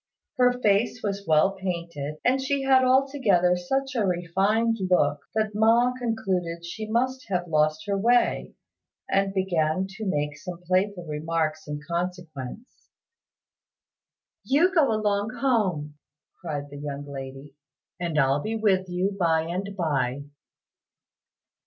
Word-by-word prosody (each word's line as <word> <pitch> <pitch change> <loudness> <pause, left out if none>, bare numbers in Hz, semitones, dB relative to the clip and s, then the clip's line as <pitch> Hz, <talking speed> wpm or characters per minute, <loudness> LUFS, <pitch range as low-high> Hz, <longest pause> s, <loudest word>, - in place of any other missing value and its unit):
Her 250 -1 +5
face 215 +3 +2
was 200 -1 -3
well 155 +4 +4
painted, 170 -6 -4
and 260 +2 +3
she 275 +1 -1
had 265 -1 +5
altogether 255 -9 +3
such 270 +10 -2
a 235 -4 +1
refined 195 +6 +1
look 145 -5 +3 0.2
that 215 -1 0
Ma 230 +4 +4
concluded 185 -8 -2
she 215 +5 -6
must 255 +3 0
have 180 -2 -1
lost 155 -1 +1
her 200 -1 0
way, 240 +5 +2 0.5
and 195 0 +1
began 185 -2 0
to 195 +2 -7
make 150 -4 -1
some 180 -2 -7
playful 185 0 0
remarks 155 0 -2
in 150 0 -5
consequence. 170 - -5 1.5
"You 330 +8 +3
go 305 -9 +4
along 210 +1 0
home," 185 - 0 0.4
cried 145 -4 -5
the 145 - -8
young 145 -1 -5
lady, 135 0 -8 0.5
"and 170 -3 -2
I'll 135 +1 +3
be 220 +6 -3
with 190 -4 +1
you 185 +3 -1
by 165 -2 +3
and 190 +4 -4
by." 140 -5 -1
185 Hz, 130 wpm, -26 LUFS, 155-220 Hz, 1.5 s, Her